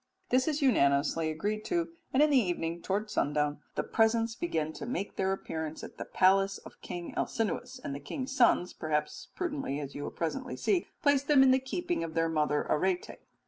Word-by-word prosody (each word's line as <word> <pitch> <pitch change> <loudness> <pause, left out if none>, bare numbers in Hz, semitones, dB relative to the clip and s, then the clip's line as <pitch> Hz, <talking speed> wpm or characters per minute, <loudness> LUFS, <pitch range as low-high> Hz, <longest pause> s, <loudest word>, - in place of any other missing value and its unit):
This 255 +3 +3
is 300 -1 0
unanimously 155 - +3
agreed 205 +7 -2
to, 340 -2 0 0.2
and 270 +3 +5
in 300 - +4
the - - +4
evening, 170 -4 -2
towards 205 +4 -2
sundown, 150 0 0 0.2
the - - 0
presents 225 0 +2
began 160 - -2
to 230 - -7
make 200 -5 -3
their 190 0 +1
appearance 160 -4 -4
at - - -10
the - - -4
palace 195 +1 +3
of - - -14
King 175 -1 -6
Alcinous, 240 +3 -2
and 140 - -4
the 140 - -5
king's 260 - -5
sons, 235 -8 +4
perhaps 150 -1 -2
prudently 290 - -2
as 140 -2 -6
you 145 - -6
will - - -3
presently 155 -5 -3
see, 350 - +1 0.2
place 285 -2 +4
them 280 -1 +5
in 265 - +6
the 260 - +4
keeping 350 - -2
of 160 -1 -6
their 165 0 +2
mother 150 -2 +1
Arete. 180 +3 0
195 Hz, 195 wpm, -30 LUFS, 155-260 Hz, 0.2 s, in